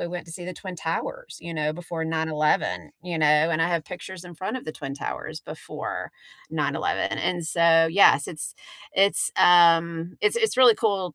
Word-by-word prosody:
we - - -2
went 175 0 -6
to 165 - -9
see 175 +1 -8
the 185 - -5
Twin 185 +1 -8
Towers, - - -5
you 170 -1 -7
know, 155 -1 -1
before 170 0 -5
9/11, 155 - 0 0.2
you 175 -2 -3
know, 155 - +3 0.2
and 165 0 +1
I 165 - +2
have 170 -3 -1
pictures 180 +1 -9
in 175 - -11
front 190 +9 -4
of 255 - -8
the 155 - -6
Twin 140 -3 -7
Towers 140 - -6
before - - -7 0.4
9/ - - -1
11, - - -1
and 175 -2 -2
so, 165 0 +4
yes, 170 -5 +5
it's 155 -3 -5 0.4
it's, 195 +1 +3
um, 170 -1 +4
it's 420 - +2
it's 445 - +1
really 250 -3 +7
cool 190 -6 -1
170 Hz, 195 wpm, -24 LUFS, 160-185 Hz, 0.4 s, really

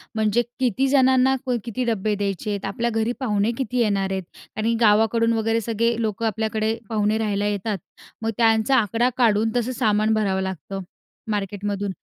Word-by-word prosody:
म्हणजे 220 +2 +2 0.2
किती 260 +1 +1
जणांना 265 -1 +4
कोई 250 -2 0
किती 245 +2 -3
डब्बे 215 -2 0
द्यायचे 200 0 -3
आहेत? 200 -2 -3
आपल्या 230 +4 -1
घरी 225 +1 0
पाहुणे 215 -3 +1
किती 250 -1 -2
येणार 195 -3 +1
आहेत? 190 -1 -2 0.3
आणि 225 +2 +1
गावाकडून 225 +1 +4
वगैरे 225 0 +1
सगळे 230 +1 0
लोकं 220 0 -2
आपल्याकडे 220 0 -1
पाहुणे 215 0 +1
राहायला 205 -2 -1
येतात, 205 0 -2 0.4
मग 225 - -1
त्यांचा 225 +2 +3
आकडा 230 +3 +2
काढून 225 -2 +3
तसं 245 +1 0
सामान 215 -2 +2
भरावं 195 -3 +1
लागतं, 190 +1 -5 0.5
मार्केटमधून. 205 0 -2
220 Hz, 160 wpm, -23 LUFS, 205-230 Hz, 0.5 s, जणांना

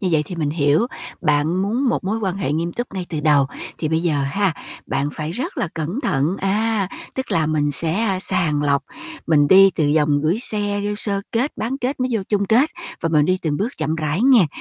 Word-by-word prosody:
như 190 - 0
vậy 155 - +3
thì 180 - -6
mình 150 -3 -1
hiểu. 150 +7 +2 0.3
Bạn 155 +3 +1
muốn 240 +7 0
một 240 - -1
mối 210 +4 -1
quan 190 -4 -2
hệ 185 -8 -1
nghiêm 170 +3 -1
túc 240 +5 -3
ngay 185 -2 -4
từ 155 -3 -3
đầu, 145 -3 +4 0.3
thì 155 - -1
bây 160 +1 0
giờ 170 -4 +1
ha, 180 +6 0 0.3
bạn 140 +2 -1
phải 155 +1 -4
rất 285 - -4
là 200 - 0
cẩn 165 - -3
thận, 155 - 0
à, 205 0 0 0.3
tức 265 - -4
là 160 -2 +2
mình 150 -1 +1
sẽ 185 +7 0
sàng 150 -6 0
lọc, 140 -1 +2 0.4
mình 145 -3 +4
đi 195 +2 +8
từ 145 -3 +1
vòng 150 -1 +3
gửi 165 +7 +1
xe, 205 -4 -1
vô 205 - -1
sơ 200 -2 0
kết, 250 +6 0
bán 255 +5 -3
kết, 260 +1 -2
mới 255 - +1
vô 220 -4 0
chung 200 -1 +1
kết 255 +10 +3 0.3
và 165 - 0
mình 150 -2 +3
đi 185 +3 +1
từng 150 -3 0
bước 205 +8 0
chậm 155 - -1
rãi 155 +5 -1
nghe. 250 -9 +6
180 Hz, 230 wpm, -21 LUFS, 150-215 Hz, 0.4 s, đi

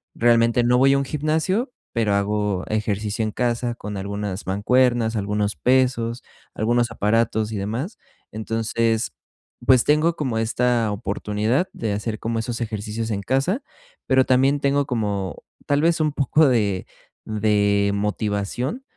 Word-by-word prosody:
realmente 115 0 +3
no 125 +1 +3
voy 135 +1 +5
a - - +3
un 140 - 0
gimnasio 160 - -1 0.2
pero 110 -4 +1
hago 100 -2 -1
ejercicio 105 0 -1
en 110 - -1
casa, 120 0 -1
con 105 -2 -6
algunas 100 0 -4
mancuernas, 120 +3 +2
algunos 105 -1 -1
pesos, 125 - +1 0.3
algunos 120 +1 +1
aparatos 110 0 +1
y - - -2
demás. 115 - -4 0.4
Entonces, 115 +1 -1 0.5
pues, 130 -2 +5
tengo 155 +3 +3
como 130 -7 -1
esta 115 0 +1
oportunidad 105 - -1
de 110 -3 -2
hacer 105 +1 -3
como 115 0 -2
esos 115 +1 -3
ejercicios 110 0 -3
en 100 -1 -2
casa, 140 - 0 0.5
pero 130 -1 +4
también 135 +3 +3
tengo 140 0 +2
como, 105 -7 -3 0.2
tal 145 +1 +2
vez, 165 0 +2
un 155 -1 +2
poco 150 +2 +3
de 100 -6 +1 0.4
de 100 -1 +2
motivación, 105 - -2
115 Hz, 140 wpm, -22 LUFS, 105-130 Hz, 0.5 s, voy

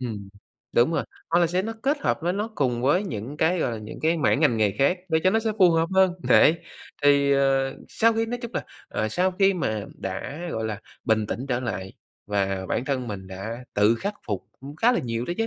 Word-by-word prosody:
ừm, 105 -6 -5 0.5
đúng 120 +8 +4
rồi, - - 0 0.3
hoặc 170 - +4
là 170 - +4
sẽ 180 +3 0
nó 225 +2 -3
kết 280 +2 +1
hợp - - 0
với 175 +1 +1
nó 210 +3 -2
cùng 125 -6 0
với 175 +10 +3
những 125 - -5
cái, 170 +3 +2
gọi 120 - 0
là, 110 - -4
những 105 0 -9
cái 165 +2 +2
mảng 150 -1 +2
ngành 125 -7 +3
nghề 105 -2 +3
khác 160 +7 +3
để 160 -1 +2
cho 185 - +6
nó 225 - +3
sẽ 220 -1 -1
phù 180 -2 +7
hợp 165 0 +2
hơn. 190 -1 +5 0.2
Đấy, 165 +2 +6 0.4
thì, 140 -1 +5
ờ, 135 -1 +2
sau 230 +1 +3
khi 225 0 0
nói 245 +1 -3
chung 235 - -5
là, - - -2 0.2
ờ, 110 - -1
sau 180 +10 +1
khi 195 -1 +4
mà 110 - -2
đã, 95 - -5
gọi 110 0 -2
là, 110 -1 -3 0.2
bình 110 -2 +2
tĩnh 130 +5 -4
trở 125 0 0
lại 95 -6 -4 0.3
và 95 -2 -1
bản 125 - -1
thân 130 -4 -2
mình 95 -2 -6
đã 110 +6 -6
tự 105 +3 +4
khắc 200 - -3
phục 100 -3 -4
cũng 140 +3 -9
khá 240 +8 +4
là - - +1
nhiều 115 -1 -3
đó 175 - -3
chứ, 225 - +1
135 Hz, 245 wpm, -25 LUFS, 110-180 Hz, 0.5 s, phù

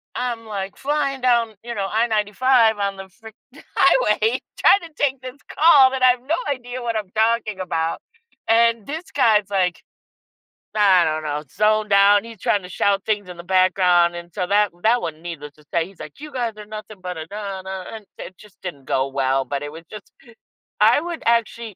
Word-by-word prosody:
I'm, 240 -2 -3
like, 200 -2 -6
flying 275 -1 -1
down, 235 -3 +2
you 235 0 -6
know, 200 -2 -2
I-95 220 +1 +2
on 200 -1 -2
the 195 0 -10
freak 220 +2 -15 0.4
highway, 255 - +3 0.2
tryna 335 -5 +4
take 275 -2 -1
this 255 +1 -9 0.2
call, 290 -5 +6
that 265 -1 -3
I 255 0 +7
have 245 0 -4
no 320 - +2
idea 250 -2 -4
what 235 -1 -3
I'm 210 -3 -3
talking 220 -2 +1
about, 165 -3 -2 0.5
and 230 -1 +3
this 320 +4 -6
guy's, 215 -7 +3
like, 185 -3 0 1.0
I 190 -4 +5
don't 155 0 -2
know, 150 0 -3
zoned 215 0 +2
out, 200 +1 +5
he's 230 -1 -11
tryna 190 -1 -1
shout 195 +1 0
things 205 -3 -1
in 180 - -9
the 170 - -9
background 180 -1 +3
and 175 0 -9
so, 185 -3 -2
that 205 +1 +2
that 235 +2 +3
one, 160 -1 -6
needless 155 -4 -8
to 150 - -22
say 170 -1 +1
He's 195 -2 -19
like, 150 - -11
"You 300 +1 -9
guys 240 -3 -2
are 210 - -9
nothing 215 0 -9
but 180 -1 -5
a 160 - -6
da 200 -1 -6
da," 190 0 -7
and 220 -2 -9
it 185 - -10
just 210 -2 -18
didn't 145 -8 -8
go 135 0 0
well, 135 0 0
but 140 +2 -4
it 145 - -6
was 165 +2 -11
just 215 -1 -11 0.7
I 225 +7 +5
would 340 0 -6
actually 230 -2 0
210 Hz, 195 wpm, -21 LUFS, 185-235 Hz, 1.0 s, I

